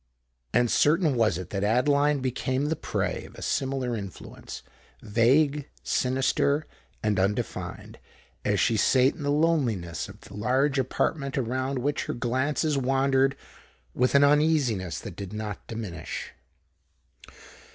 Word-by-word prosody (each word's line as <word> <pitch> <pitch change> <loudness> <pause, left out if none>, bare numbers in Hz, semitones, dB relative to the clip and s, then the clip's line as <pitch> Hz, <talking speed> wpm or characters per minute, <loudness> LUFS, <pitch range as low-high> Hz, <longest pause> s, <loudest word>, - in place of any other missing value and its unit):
And 120 -1 +2
certain 155 0 +3
was 110 -7 +2
it 90 -2 -7
that 100 0 -2
Adeline 140 +6 +3
became 130 +1 -1
the 160 - +1
prey - - -2
of - - -14
a - - -8
similar 130 -3 -1
influence—vague, 120 - -1
sinister, 135 +3 +1 0.4
and 105 -2 +1
undefined,—as 100 +2 -3
she 115 - +2
sate 130 +6 +4
in - - -11
the 145 - -1
loneliness 135 - 0
of - - -13
the - - -13
large 135 +7 +1
apartment 140 +2 -1
around 130 +2 -1
which 140 +3 -1
her - - -3
glances 135 +5 0
wandered 135 +1 +2 0.6
with 125 +2 +1
an 140 - +7
uneasiness 145 - +2
that - - -8
did 100 0 -7
not 105 -1 -5
diminish. 100 -8 -6
130 Hz, 125 wpm, -27 LUFS, 110-145 Hz, 0.6 s, an